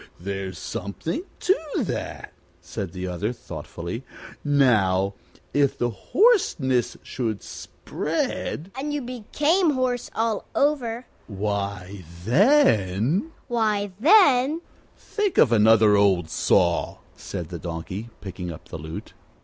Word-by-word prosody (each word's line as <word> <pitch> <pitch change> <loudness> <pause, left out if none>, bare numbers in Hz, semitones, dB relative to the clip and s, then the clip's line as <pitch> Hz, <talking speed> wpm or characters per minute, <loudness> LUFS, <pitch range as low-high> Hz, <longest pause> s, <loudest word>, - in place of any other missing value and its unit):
"There's 95 +1 -4
something 160 - -4 0.2
to 380 - +4 0.2
that," - - -4 0.3
said 100 -6 -6
the 90 0 -5
other, 90 +5 -2
thoughtfully. 85 - -7 0.4
"Now, 105 -10 +3 0.4
if 140 -1 +2
the 120 0 0
hoarseness 130 - +2
should 110 -5 -3
spread 175 +6 -4
" - - -25
"And 295 +2 -3
you 290 - -3
became 295 - +1
horse 255 -2 -1
all 225 -1 0
over 255 -5 +1
" - - -33
"Why, 100 -2 -3 0.2
then 150 - +3
" - - -33
"Why, 215 -4 0
then 300 - +5 0.2
" - - -33
"Think 415 -3 -2
of 125 - +6
another 110 -1 +6
old 95 -5 +3
saw," 85 0 +2 0.2
said 85 -2 -6
the 85 - -6
Donkey, 90 +6 -5
picking 90 -3 -6
up 80 - -11
his 80 - -6
lute. 80 +2 -8
120 Hz, 125 wpm, -24 LUFS, -, 0.4 s, of